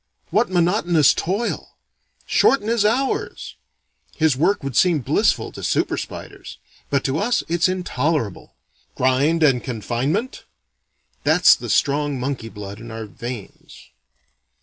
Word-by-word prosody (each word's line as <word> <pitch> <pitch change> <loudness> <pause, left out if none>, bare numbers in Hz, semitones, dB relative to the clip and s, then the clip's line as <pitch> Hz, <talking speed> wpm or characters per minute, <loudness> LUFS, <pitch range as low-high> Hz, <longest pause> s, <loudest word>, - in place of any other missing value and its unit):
What 220 +3 +2
monotonous 175 - +3
toil! 200 +7 -3 0.5
Shorten 270 -6 +3
his 230 -2 +2
hours!" 250 +6 -1 0.6
His 160 -4 +2
work 175 +8 +1
would 135 -3 -4
seem 170 -1 +3
blissful - - +1
to - - -10
super - - 0
spiders, - - -8 0.3
but 140 -1 0
to 135 +3 -1
us 240 +4 +1
it's 170 +2 +2
intolerable. 155 - -2 0.4
"Grind 140 +6 +2
and 130 -5 +3
confinement?" 130 - -3 0.8
That's - - +6
the - - -8
strong 145 -1 +1
monkey 125 -3 -4
blood 100 -1 -9
in 115 +1 -10
our 110 -1 -6
veins. 115 +1 -9
150 Hz, 125 wpm, -21 LUFS, 125-185 Hz, 0.8 s, That's